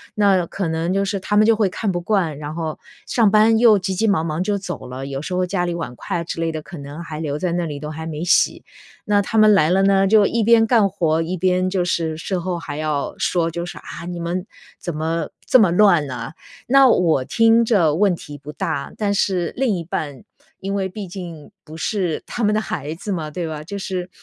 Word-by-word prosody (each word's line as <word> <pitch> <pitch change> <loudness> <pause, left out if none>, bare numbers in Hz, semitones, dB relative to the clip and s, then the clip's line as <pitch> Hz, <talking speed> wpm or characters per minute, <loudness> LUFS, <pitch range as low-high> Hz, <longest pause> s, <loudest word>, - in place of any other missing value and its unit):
那 195 -4 +3
可 190 +1 -3
能 165 +2 -1
就 195 +1 +1
是 200 0 -2
他 200 +2 -2
们 210 +1 +5
就 225 0 +5
会 215 -2 +2
看 200 +2 -2
不 175 - -2
惯， 175 -5 0
然 150 0 -6
后 160 -2 -4 0.3
上 230 -4 +3
班 215 +2 +5
又 225 -3 +6
急 190 +1 -2
急 220 +4 +1
忙 190 -6 +2
忙 155 +1 -2
就 205 +1 0
走 185 -7 -6
了， 130 +2 -6
有 135 0 -4
时 170 +5 -5
候 180 0 +1
家 180 -1 -1
里 175 - -2
碗 165 -7 -5
筷 - - -3
啊 - - -4
之 170 - -6
类 165 0 0
的， 155 - -4
可 175 +3 -10
能 145 +3 -8
还 155 -2 -7
留 150 -2 -2
在 180 +1 -1
那 175 0 -1
里， 145 -3 -5
都 150 +1 -6
还 160 +1 -6
没 160 0 -5
洗。 180 - +2 0.4
那 205 -1 +3
他 220 +3 -3
们 215 0 +7
来 155 -5 +4
了 190 +1 +3
呢， 195 0 +4
就 210 0 +5
一 230 -1 0
边 225 +1 +5
干 220 -4 +4
活， 165 -4 0
一 175 +3 -3
边 185 +1 +1
就 185 -1 0
是 165 -3 -1
事 185 +4 -3
后 175 0 -3
还 145 -3 -6
要 150 -2 -2
说， 170 -2 0
就 170 +1 -4
是： 175 - -8
“啊， 170 +2 -9
你 175 -1 -5
们 175 +2 -3 0.4
怎 175 - -4
么 160 +1 -2 0.2
这 255 - +5
么 195 -6 +4
乱 175 -4 +4
呢？” 125 +1 -6 0.3
那 275 +1 +6
我 165 - +3
听 230 - +4
着 175 -10 +3
问 195 0 +3
题 150 -3 -10
不 145 +1 -9
大， 140 -2 -3
但 205 -2 0
是 185 -4 0
另 250 -5 +1
一 170 - -5
半 145 -5 -5 0.4
因 195 +1 -4
为 195 -1 -1
毕 200 +1 -7
竟 170 -4 -9
不 155 - -11
是 180 -2 -1
他 240 - -4
们 210 0 +3
的 215 - +2
孩 150 -7 -4
子 200 +5 -6
嘛， 155 -4 -4
对 170 +2 -4
吧？ 155 -1 -6
就 200 +6 -6
是 185 -2 -4
175 Hz, 265 characters per minute, -20 LUFS, 160-200 Hz, 0.4 s, 们